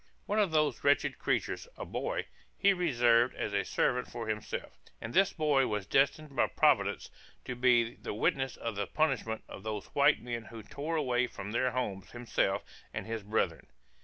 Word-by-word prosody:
One 210 Hz, +2 st, 0 dB
of 205 Hz, -3 st, +3 dB
those 155 Hz, -2 st, +1 dB
wretched 140 Hz, 0 st, +2 dB
creatures, -, -, -1 dB
a -, -, -5 dB
boy, -, -, -3 dB, 0.3 s
he 200 Hz, -1 st, +5 dB
reserved 120 Hz, -9 st, +3 dB
as 105 Hz, -, -3 dB
a 100 Hz, -1 st, +1 dB
servant 125 Hz, +5 st, 0 dB
for 115 Hz, -2 st, -6 dB
himself; 110 Hz, -1 st, -4 dB, 0.2 s
and 115 Hz, -, -6 dB
this 195 Hz, 0 st, +4 dB
boy 145 Hz, -5 st, +2 dB
was 105 Hz, -2 st, -2 dB
destined 140 Hz, +3 st, +1 dB
by -, -, +3 dB
Providence -, -, +2 dB, 0.3 s
to 125 Hz, -, -3 dB
be 120 Hz, -2 st, +3 dB
the -, -, -5 dB
witness 135 Hz, +4 st, 0 dB
of 115 Hz, -2 st, -4 dB
the 100 Hz, -, -2 dB
punishment 130 Hz, -8 st, 0 dB
of -, -, -9 dB
those 105 Hz, -1 st, -4 dB
white -, -, +4 dB
men 120 Hz, -2 st, -5 dB
who 115 Hz, 0 st, -9 dB
tore 150 Hz, +9 st, -4 dB
away 125 Hz, -5 st, +1 dB
from 100 Hz, -3 st, -7 dB
their 125 Hz, +3 st, +1 dB
homes 120 Hz, -7 st, -3 dB
himself 115 Hz, -4 st, -1 dB, 0.3 s
and -, -, -5 dB
his 115 Hz, -1 st, -4 dB
brethren. 105 Hz, +2 st, -1 dB
120 Hz, 180 wpm, -31 LUFS, 110-145 Hz, 0.3 s, he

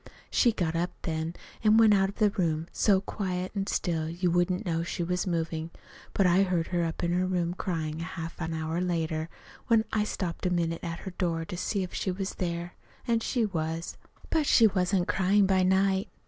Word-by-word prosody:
"She 240 Hz, -, +4 dB
got 170 Hz, -6 st, -1 dB
up 175 Hz, +2 st, 0 dB
then 160 Hz, +1 st, -2 dB, 0.3 s
an' 215 Hz, 0 st, +6 dB
went 220 Hz, -2 st, +7 dB
out 195 Hz, -1 st, +3 dB
of 200 Hz, -, -9 dB
the 210 Hz, -2 st, +3 dB
room 165 Hz, -5 st, 0 dB
so 195 Hz, -3 st, +3 dB
quiet 185 Hz, -2 st, -3 dB
an' 195 Hz, 0 st, -1 dB
still 160 Hz, -3 st, -1 dB
you 175 Hz, +1 st, 0 dB
wouldn't 175 Hz, +1 st, +1 dB
know 165 Hz, -2 st, 0 dB
she 170 Hz, +1 st, -3 dB
was 180 Hz, +2 st, -1 dB
movin'. 165 Hz, -2 st, -2 dB, 0.4 s
But 195 Hz, -, +3 dB
I 180 Hz, +2 st, +5 dB
heard 180 Hz, -4 st, 0 dB
her 175 Hz, -1 st, +1 dB
up 165 Hz, +1 st, -3 dB
in 170 Hz, -, +1 dB
her 180 Hz, +1 st, +1 dB
room 175 Hz, -2 st, 0 dB
cryin' 160 Hz, -4 st, -3 dB
half 165 Hz, -1 st, -6 dB
an 160 Hz, -1 st, -2 dB
hour 160 Hz, +2 st, -2 dB
later, 165 Hz, -3 st, -1 dB, 0.4 s
when 225 Hz, -2 st, +4 dB
I 215 Hz, -, +2 dB
stopped 180 Hz, -4 st, -3 dB
a -, -, +2 dB
minute 170 Hz, -2 st, -1 dB
at 170 Hz, -1 st, -4 dB
her 190 Hz, -, -6 dB
door 170 Hz, -3 st, -1 dB
to 180 Hz, -, -6 dB
see 190 Hz, +2 st, -1 dB
if 180 Hz, -, -7 dB
she -, -, -2 dB
was 190 Hz, +1 st, -3 dB
there. 170 Hz, -1 st, -3 dB, 0.3 s
An' 230 Hz, -1 st, +3 dB
she 230 Hz, 0 st, 0 dB
was. 165 Hz, -3 st, -3 dB, 0.4 s
"But 310 Hz, -3 st, +2 dB
she 230 Hz, -, +6 dB
wasn't 185 Hz, -2 st, +2 dB
cryin' 195 Hz, +2 st, +3 dB
by 190 Hz, -1 st, +3 dB
night. 190 Hz, +1 st, +2 dB
180 Hz, 205 wpm, -28 LUFS, 165-195 Hz, 0.4 s, went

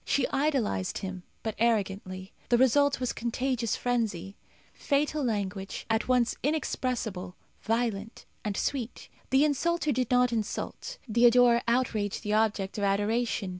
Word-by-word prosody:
She 280 Hz, -, +1 dB
idolized 265 Hz, -, 0 dB
him, 190 Hz, -1 st, -5 dB, 0.2 s
but 220 Hz, -, -2 dB
arrogantly. 195 Hz, -4 st, -1 dB, 0.2 s
The 240 Hz, -, +5 dB
result 280 Hz, +3 st, +4 dB
was 250 Hz, -1 st, -1 dB
contagious 240 Hz, 0 st, -1 dB
frenzy. 215 Hz, -6 st, -2 dB, 0.4 s
Fatal 295 Hz, +1 st, 0 dB
language, 200 Hz, -4 st, -3 dB
at 220 Hz, 0 st, +1 dB
once 250 Hz, -2 st, +2 dB
inexpressible, 245 Hz, -, -2 dB, 0.3 s
violent, 225 Hz, -1 st, -2 dB, 0.2 s
and 205 Hz, -2 st, -2 dB
sweet. 255 Hz, -4 st, -3 dB, 0.2 s
The 270 Hz, +3 st, +4 dB
insulter 310 Hz, +2 st, +1 dB
did 250 Hz, -2 st, 0 dB
not 250 Hz, -1 st, +3 dB
insult; 230 Hz, -, -4 dB
the 235 Hz, +2 st, +5 dB
adorer 240 Hz, 0 st, +5 dB
outraged 230 Hz, -5 st, 0 dB
the 210 Hz, -1 st, -1 dB
object 215 Hz, -2 st, 0 dB
of -, -, -2 dB
adoration. 205 Hz, +1 st, 0 dB
235 Hz, 130 wpm, -28 LUFS, 205-255 Hz, 0.4 s, The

